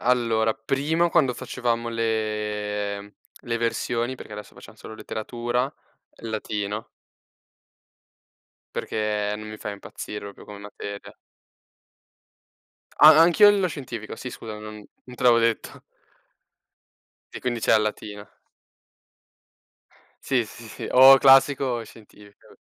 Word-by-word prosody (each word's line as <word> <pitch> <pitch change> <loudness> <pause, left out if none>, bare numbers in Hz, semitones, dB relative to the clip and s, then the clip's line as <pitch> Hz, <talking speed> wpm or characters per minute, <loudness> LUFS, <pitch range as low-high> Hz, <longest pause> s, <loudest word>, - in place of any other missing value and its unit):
allora 115 -3 +1
prima 145 +9 0
quando 130 -5 +2
facevamo 115 -1 -2
le 105 -2 -3 0.3
le 115 -1 -1
versioni, 120 +1 -1
perché 110 - -11
adesso 105 0 -9
facciam - - -14
solo 110 - -11
letteratura, 120 +5 -3 0.5
il 115 - -6
latino. 105 0 -4 1.9
Perché 105 -1 -2
non 110 0 -9
mi 110 - -8
fa 105 - -6
impazzire 100 0 -8
proprio 100 - -12
come 105 -1 -11
materia. 100 0 -9 1.8
A 155 +1 +9
anch'io 175 +5 +7
lo 200 -2 +2
scientifico, 120 -10 -7
sì 125 - -7
scusa, 110 -3 -8
non 105 0 -9 0.2
non 125 - -12
te - - -8
l'avevo 120 -2 +6
detto. 115 -1 -1 1.5
E - - -8
quindi 120 -2 -2
c'è - - +2
a 110 - +6
latina. 105 -1 -5 2.0
Sì, 130 -4 +1
sì, 115 +2 -13
sì, - - -7
o 135 +1 +9
classico 135 +1 +5
o 120 -3 -2
scientifico. 105 -2 -18
115 Hz, 120 wpm, -24 LUFS, 105-125 Hz, 2.0 s, A